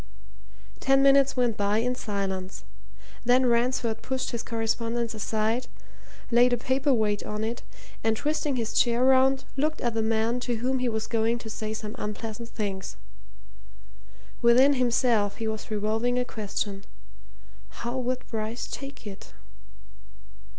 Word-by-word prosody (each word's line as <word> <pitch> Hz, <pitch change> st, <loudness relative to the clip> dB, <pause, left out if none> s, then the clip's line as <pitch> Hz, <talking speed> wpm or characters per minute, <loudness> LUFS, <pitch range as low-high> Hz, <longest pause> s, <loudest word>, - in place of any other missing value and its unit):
Ten 270 Hz, 0 st, +4 dB
minutes 275 Hz, -1 st, +5 dB
went 240 Hz, -3 st, +2 dB
by 205 Hz, +1 st, +1 dB
in 245 Hz, +3 st, +1 dB
silence; 195 Hz, -5 st, -4 dB, 0.6 s
then 250 Hz, +2 st, +4 dB
Ransford 235 Hz, -1 st, +1 dB
pushed 260 Hz, 0 st, -2 dB
his 235 Hz, -2 st, -2 dB
correspondence 230 Hz, +1 st, -1 dB
aside, 220 Hz, +3 st, -1 dB, 0.6 s
laid 245 Hz, +1 st, +5 dB
a -, -, +3 dB
paper 265 Hz, +4 st, +1 dB
weight 215 Hz, -4 st, +1 dB
on 210 Hz, +1 st, -4 dB
it, 230 Hz, +2 st, -3 dB, 0.4 s
and 220 Hz, 0 st, +2 dB
twisting 295 Hz, 0 st, -1 dB
his 230 Hz, -3 st, -2 dB
chair 240 Hz, 0 st, +3 dB
round, 265 Hz, 0 st, +4 dB
looked 305 Hz, +3 st, 0 dB
at 240 Hz, -2 st, 0 dB
the 225 Hz, -, 0 dB
man 225 Hz, +2 st, +1 dB
to 245 Hz, -1 st, -2 dB
whom 255 Hz, +3 st, 0 dB
he 250 Hz, -1 st, +1 dB
was 220 Hz, -1 st, -2 dB
going 230 Hz, +1 st, +1 dB
to 225 Hz, -2 st, -8 dB
say 215 Hz, 0 st, -4 dB
some 215 Hz, -1 st, -6 dB
unpleasant 220 Hz, +2 st, -5 dB
things. 195 Hz, -4 st, -4 dB, 1.4 s
Within 250 Hz, +4 st, +6 dB
himself 235 Hz, -5 st, +2 dB
he 225 Hz, -, -3 dB
was 220 Hz, -1 st, -4 dB
revolving 220 Hz, +3 st, 0 dB
a 250 Hz, -, +1 dB
question 205 Hz, -3 st, -4 dB, 0.9 s
how 235 Hz, +1 st, -5 dB
would 255 Hz, 0 st, -2 dB
Bryce 220 Hz, +1 st, -3 dB
take 275 Hz, -4 st, -8 dB
it? 200 Hz, -1 st, -9 dB
235 Hz, 145 wpm, -27 LUFS, 220-250 Hz, 1.4 s, Within